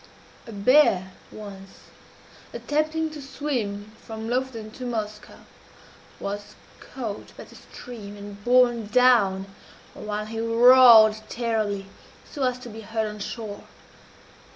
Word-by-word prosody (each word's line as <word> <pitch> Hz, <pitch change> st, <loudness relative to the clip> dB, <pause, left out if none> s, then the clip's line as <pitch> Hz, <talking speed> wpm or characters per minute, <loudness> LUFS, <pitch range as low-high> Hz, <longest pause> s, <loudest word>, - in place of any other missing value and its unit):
A -, -, -8 dB
bear 200 Hz, -3 st, +3 dB, 0.2 s
once, 195 Hz, -2 st, -11 dB, 0.7 s
attempting 310 Hz, +1 st, -1 dB
to 305 Hz, -1 st, -9 dB
swim 240 Hz, -7 st, -4 dB
from 220 Hz, 0 st, -7 dB
Lofoden 245 Hz, -4 st, -3 dB
to 255 Hz, -, -10 dB
Moskoe, 215 Hz, -3 st, -6 dB, 0.7 s
was 205 Hz, +1 st, -6 dB, 0.2 s
caught 225 Hz, -6 st, -8 dB
by -, -, -9 dB
the -, -, -17 dB
stream 210 Hz, -4 st, -11 dB
and 205 Hz, 0 st, -10 dB
borne 240 Hz, -2 st, +3 dB
down, 210 Hz, -5 st, +3 dB, 0.5 s
while 210 Hz, 0 st, -5 dB
he 225 Hz, +1 st, -6 dB
roared 230 Hz, -1 st, +7 dB
terribly, 215 Hz, -4 st, -2 dB, 0.4 s
so 290 Hz, -, -8 dB
as 250 Hz, -1 st, +1 dB
to 250 Hz, -1 st, -10 dB
be 225 Hz, 0 st, -9 dB
heard 220 Hz, +1 st, -2 dB
on 210 Hz, 0 st, -8 dB
shore. 205 Hz, -1 st, -7 dB
225 Hz, 120 wpm, -24 LUFS, 205-250 Hz, 0.7 s, roared